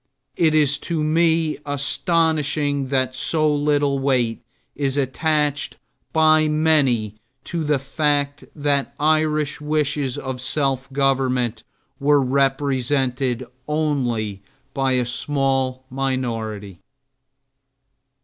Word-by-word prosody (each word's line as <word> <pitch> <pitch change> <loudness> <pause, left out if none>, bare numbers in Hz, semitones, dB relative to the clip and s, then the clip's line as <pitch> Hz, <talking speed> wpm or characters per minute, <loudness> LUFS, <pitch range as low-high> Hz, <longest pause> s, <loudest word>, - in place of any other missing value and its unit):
It 160 -2 +3
is 145 -1 +3
to 165 -1 -2
me 160 0 +2
astonishing 145 -1 0
that 130 -1 0
so 155 +3 +1
little 145 -1 +1
weight 125 -4 0 0.3
is 140 -1 0
attached 145 +1 0 0.3
by 155 -1 +4
many 145 -9 +2 0.3
to 170 -2 -3
the 150 -1 +2
fact 145 +1 -1
that 145 -2 0
Irish 155 -1 +1
wishes 150 -3 -1
of 130 -1 -5
self 135 -1 -1
government 130 -4 0 0.4
were 145 +1 +4
represented 135 -1 0 0.2
only 125 -10 -1 0.3
by 135 -1 +1
a 125 -1 +1
small 135 0 -1
minority. 115 -8 -3
140 Hz, 95 wpm, -21 LUFS, 130-150 Hz, 0.4 s, by